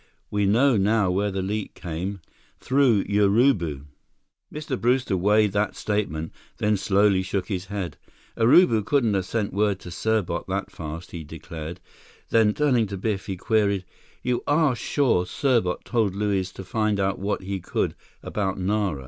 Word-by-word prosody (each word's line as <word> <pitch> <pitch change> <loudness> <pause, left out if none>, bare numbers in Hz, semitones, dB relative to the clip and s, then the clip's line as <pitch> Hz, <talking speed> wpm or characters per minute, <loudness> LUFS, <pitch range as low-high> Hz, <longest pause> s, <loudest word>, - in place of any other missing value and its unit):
We 105 -1 +1
know 120 +4 +4
now 100 -1 +2
where 100 +3 0
the 95 -1 -3
leak 105 +2 -3
came. 90 +3 -5 0.4
Through 130 -6 +3
Urubu." 100 - +2 0.7
Mr. 150 -4 -4
Brewster 125 -3 +2
weighed 105 +3 +3
that 105 0 0
statement, 90 -7 -2 0.3
then 105 0 +2
slowly 100 0 +3
shook 95 +1 -3
his 95 -2 -3
head. 100 -3 -5 0.4
"Urubu 115 - +5
couldn't 120 -2 +2
have 95 -1 -1
sent 110 -3 -2
word 100 -1 +1
to - - -9
Serbot 110 -1 -1
that - - -3
fast," 80 +3 -7
he 85 -2 -6
declared, 80 +2 -8 0.5
then, 110 -2 +4
turning 125 -7 +2
to 100 0 -5
Biff, 100 0 -2
he 95 - -3
queried: 100 -2 +1 0.4
"You 125 -1 0
are 145 -3 +3
sure 120 -7 +1
Serbot 115 -7 0
told 110 -6 0
Luiz 100 -2 0
to 95 - -8
find 105 +1 0
out 95 0 0
what 100 0 -2
he 95 0 -3
could - - -2 0.3
about 95 -2 -2
Nara?" 95 -4 0
100 Hz, 155 wpm, -24 LUFS, 95-110 Hz, 0.7 s, Urubu